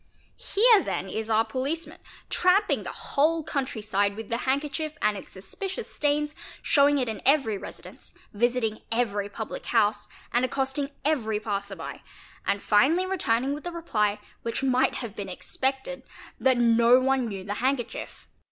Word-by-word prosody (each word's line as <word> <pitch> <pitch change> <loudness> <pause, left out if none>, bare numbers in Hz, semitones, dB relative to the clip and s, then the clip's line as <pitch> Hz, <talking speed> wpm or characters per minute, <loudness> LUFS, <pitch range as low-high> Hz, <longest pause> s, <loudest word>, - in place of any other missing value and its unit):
Here 440 0 +5
then 195 - -3
is 220 +3 -4
our 220 0 +3
policeman, 285 +6 -3 0.3
tramping 370 +4 +3
the - - -5
whole 315 +3 +1
country 265 -7 -3
side 200 -1 +1
with 220 0 -7
the 230 - 0
handkerchief 295 +3 -1
and 210 0 +2
its - - -9
suspicious 365 - -5
stains, 295 0 0 0.3
showing 285 0 +4
it 255 -3 0
in 220 - -4
every 270 -6 +3
residence, 195 - -10 0.2
visiting 230 0 0
every 210 -4 0
public 220 +2 -6
i. 235 - 0
house, 210 -1 +2 0.3
and 240 +1 +3
accosting 270 +2 -1 0.2
every 225 -9 +1
passerby, 200 -2 -4 0.5
and 200 - 0
finally 290 - +4
returning 275 -8 0
with 295 - -6
the 350 - -4
reply, 215 -12 0 0.2
which 230 +3 -3
might 255 -1 +2
have 230 -5 -5
been 195 -2 -5
expected, 265 +7 -2 0.4
that 260 -1 +3
no 235 +1 +5
one 260 -1 +1
knew 195 -3 -5
the 200 +1 -3
handkerchief. 255 -2 -2
250 Hz, 155 wpm, -27 LUFS, 215-290 Hz, 0.5 s, Here